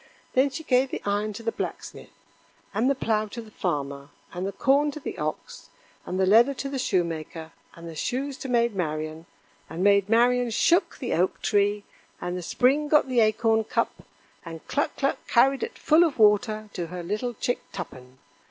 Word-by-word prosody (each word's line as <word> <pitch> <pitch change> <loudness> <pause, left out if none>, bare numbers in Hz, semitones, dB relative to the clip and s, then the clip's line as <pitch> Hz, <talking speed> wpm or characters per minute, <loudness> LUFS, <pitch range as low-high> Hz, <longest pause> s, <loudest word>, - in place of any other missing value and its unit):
Then 265 +2 +3
she 275 +4 -7
gave 260 -2 +2
the - - -5
iron 205 +1 0
to 230 - -9
the 230 - 0
Blacksmith, - - -6 0.6
and 225 +6 +2
the 275 - +2
plow 215 -4 0
to 220 +3 -8
the 220 -2 -10
Farmer, 140 -6 -3 0.2
and 180 +2 -3
the - - -3
corn 280 +8 +2
to 290 - -6
the - - -6
ox, - - -5 0.4
and 185 - -3
the 190 - +3
leather 235 +8 +5
to 275 - -4
the 275 -1 -3
Shoemaker, 165 -6 -2 0.2
and 170 0 -10
the 165 - -7
shoes 265 - -3
to 270 - -6
Maid 235 -2 +2
Marian; 155 -2 -3 0.4
and 170 +3 -4
Maid 200 0 +4
Marian 245 +2 +3
shook 340 - +2
the 250 - -3
Oak 180 +3 +1
tree, 205 0 +1 0.4
and 175 - -4
the 180 - -4
Spring 265 - +2
got 295 -2 +3
the 250 -2 +2
acorn 220 0 +3
cup, - - -2 0.4
and 165 -1 -10
Cluck 290 - -1
cluck 275 0 -2
carried 265 +3 +3
it 465 - -5
full 320 +3 +4
of 325 -5 0
water 215 0 +3
to 175 -2 -4
her 180 +1 -6
little 215 +7 -3
chick 245 - -1
Tuppen. 130 -7 -9
215 Hz, 190 wpm, -26 LUFS, 180-255 Hz, 0.6 s, leather